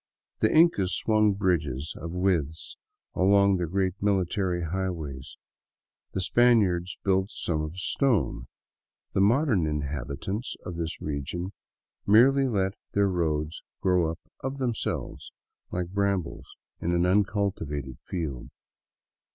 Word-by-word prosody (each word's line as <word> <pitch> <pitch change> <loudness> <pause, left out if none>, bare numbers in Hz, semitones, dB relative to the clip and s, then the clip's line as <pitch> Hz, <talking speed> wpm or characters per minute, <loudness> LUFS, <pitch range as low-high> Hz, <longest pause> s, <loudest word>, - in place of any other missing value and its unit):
The - - +3
Incas 155 - +4
swung 110 -2 +3
bridges 80 -7 -1
of 85 - -6
withes 85 -4 -1 0.4
along 100 +1 +4
their 90 -1 -1
great 95 +1 0
military 95 -2 0
highways, 80 -6 -4 0.8
the 95 - -1
Spaniards 95 -6 +3
built 95 0 +2
some 80 -3 -2
of 75 +3 -5
stone; 100 - 0 0.7
the - - +2
modern 110 - +3
inhabitants 75 - -3
of 90 - -5
this 85 -1 -4
region 80 +6 -4 0.5
merely 135 +6 +6
let 95 -5 0 0.2
their 100 -1 +3
roads 80 -3 -1 0.2
grow 90 -3 +2
up 80 - -4 0.2
of 135 +1 -4
themselves, 125 -5 -3 0.4
like 90 -1 -3
brambles 100 -3 -1 0.3
in 85 - 0
an 85 0 +2
uncultivated 90 - 0
field. 75 -9 -4
90 Hz, 115 wpm, -27 LUFS, 80-100 Hz, 0.8 s, merely